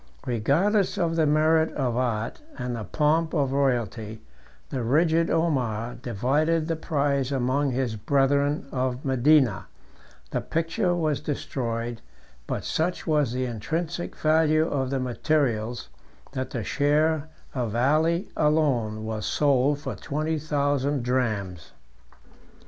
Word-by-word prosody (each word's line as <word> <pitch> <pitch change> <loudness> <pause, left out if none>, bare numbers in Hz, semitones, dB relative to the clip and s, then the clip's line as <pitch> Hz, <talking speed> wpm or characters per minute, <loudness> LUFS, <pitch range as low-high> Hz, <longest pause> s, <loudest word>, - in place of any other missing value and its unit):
Regardless 155 - +1
of 165 -2 0
the 160 -2 +3
merit 160 +2 +3
of 125 -5 -1
art, 120 - -2 0.2
and 125 -1 -3
the 115 - -4
pomp 160 +2 +1
of 140 -4 +1
royalty, 120 -5 -1 0.5
the 130 - -2
rigid 160 +7 +2
Omar 125 -9 0
divided 135 +8 0
the 165 - 0
prize 140 -4 0
among 135 +2 +1
his 125 -3 -1
brethren 140 +5 +1
of 130 0 -2
Medina: 130 -4 +3 0.6
the - - -1
picture 170 +3 0
was 155 -4 0
destroyed; 120 -5 -3 0.5
but - - -3
such 175 +3 -1
was 150 -6 +2
the 130 +1 -1
intrinsic 160 +9 -3
value 155 0 +3
of 135 -4 -1
the 135 0 -1
materials, 120 - -1 0.4
that 130 0 -3
the 115 - -4
share 150 +5 +1 0.2
of 120 -4 -2
Ali 155 - +2
alone 130 -9 +1
was 110 -1 -3
sold 140 -1 +2
for - - -4
twenty 155 +1 -2
thousand 145 -2 0
drams. 105 - -2
140 Hz, 125 wpm, -26 LUFS, 120-155 Hz, 0.6 s, the